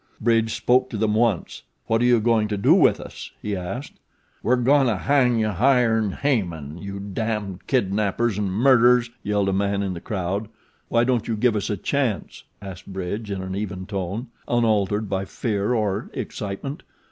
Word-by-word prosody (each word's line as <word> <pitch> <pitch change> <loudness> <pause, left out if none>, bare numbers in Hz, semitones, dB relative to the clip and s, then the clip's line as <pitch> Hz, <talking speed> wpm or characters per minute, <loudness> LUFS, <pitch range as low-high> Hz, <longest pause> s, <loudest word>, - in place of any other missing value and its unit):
Bridge 115 -1 +2
spoke 125 +1 +2
to 110 - -4
them 105 0 +1
once. 110 -5 0 0.2
"What 115 0 +1
are - - +3
you 120 -1 +5
going 110 -1 +2
to 105 -1 -2
do 100 - +5
with - - +4
us?" - - -9
he 105 -1 -3
asked. 100 +10 -6 0.4
"We're 125 - +3
goin' 135 +2 +3
to 110 -4 +1
hang 125 +1 +2
you 110 -1 +1
higher 120 +2 +3
'n' 105 -4 -1
Haman, 85 - -2
you 100 +1 -6
damned 100 -1 -4
kidnappers 105 -2 0
an' 100 -2 -1
murderers," 120 +2 +4
yelled 100 -1 0
a - - 0
man 100 +1 0
in 95 -2 -2
the 85 - -7
crowd. 100 -1 -3 0.4
"Why 115 0 +3
don't 120 -2 0
you 115 - 0
give 115 +1 +2
us 105 -1 -2
a 105 - -1
chance?" 125 0 -2 0.2
asked 95 -3 -9
Bridge 95 +3 -4
in 95 -2 -3
an 95 0 -5
even 100 -2 -4
tone, 100 +4 -4 0.2
unaltered 110 -3 +1
by 95 0 -2
fear 105 +1 -1
or 105 -3 -1
excitement. 105 +9 -5
105 Hz, 180 wpm, -23 LUFS, 100-120 Hz, 0.4 s, you